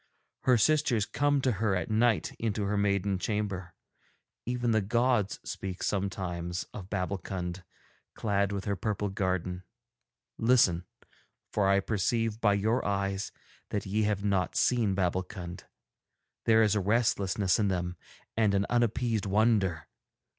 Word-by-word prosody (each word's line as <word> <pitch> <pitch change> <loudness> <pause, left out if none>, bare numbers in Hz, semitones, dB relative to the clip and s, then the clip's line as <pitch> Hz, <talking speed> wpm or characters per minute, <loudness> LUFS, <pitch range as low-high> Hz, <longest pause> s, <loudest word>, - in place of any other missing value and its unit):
Her 125 -2 +5
sisters 125 -4 +3
come 145 +4 +1
to 130 - +2
her 105 -2 0
at 90 - -2
night 110 0 +2
into 110 -2 -1
her 100 +1 0
maiden 100 -1 +1
chamber. 100 -4 -3 0.7
Even 120 -1 0
the 110 -1 +3
gods 115 0 +1
speak 95 -1 -5
sometimes 90 -3 -2
of 95 -2 -8
Babbulkund, 90 -1 -3 0.5
clad 100 -2 0
with 100 -1 -3
her 100 - 0
purple 105 0 -2
garden. 95 -2 -2 0.8
Listen, 110 -8 +4 0.7
for 100 -2 +2
I 100 0 +4
perceive 115 +2 -1
by 105 -2 +4
your 110 +5 +1
eyes 100 -1 -1 0.4
that 105 - -2
ye 105 +3 0
have 105 -2 0
not 100 -3 0
seen 115 -6 +2
Babbulkund; 90 -1 -3 0.8
there 110 0 +5
is 105 - +3
a 105 - +2
restlessness 100 -2 +1
in 105 - +2
them 90 -2 -1 0.4
and 110 -3 +3
an 100 0 +2
unappeased 115 -2 +1
wonder. 100 -5 +2
100 Hz, 135 wpm, -29 LUFS, 95-110 Hz, 0.8 s, Her